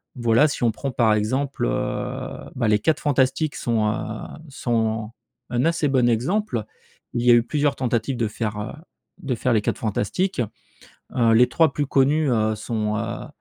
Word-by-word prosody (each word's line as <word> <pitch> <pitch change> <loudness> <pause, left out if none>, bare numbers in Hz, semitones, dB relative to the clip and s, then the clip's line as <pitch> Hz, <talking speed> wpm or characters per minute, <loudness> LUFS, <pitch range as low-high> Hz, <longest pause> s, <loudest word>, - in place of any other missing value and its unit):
Voilà, 120 +3 +4
si 140 - -3
on 115 - +4
prend 135 +5 -4
par 115 -3 +3
exemple, 130 +7 -1
heu, - - -3
ben, 120 -3 0
Les 105 0 +3
4 155 +9 +1
Fantastiques 145 +2 +1
sont, 115 -3 0
heu, - - 0 0.6
sont 115 -4 -1 0.4
un 120 +2 0
assez 165 -2 +1
bon 130 -3 +3
exemple. 125 - 0 0.5
Il 120 - -1
y 125 - +7
a - - +9
eu 120 - +4
plusieurs 145 +2 0
tentatives 125 0 -1
de 115 -2 0
faire, 105 0 -3
heu, 105 - -4 0.5
de 135 -4 -1
faire 125 +2 0
Les 110 - +3
4 - - -1
Fantastiques, 120 - -1 0.8
heu, 115 -2 +4
les 125 +2 +5
3 155 +2 +3
plus 145 - -1
connues, 140 +2 +2
heu, 110 -1 +1
sont, 105 -1 -2
heu, 115 +1 -4
120 Hz, 180 wpm, -23 LUFS, 110-140 Hz, 0.8 s, a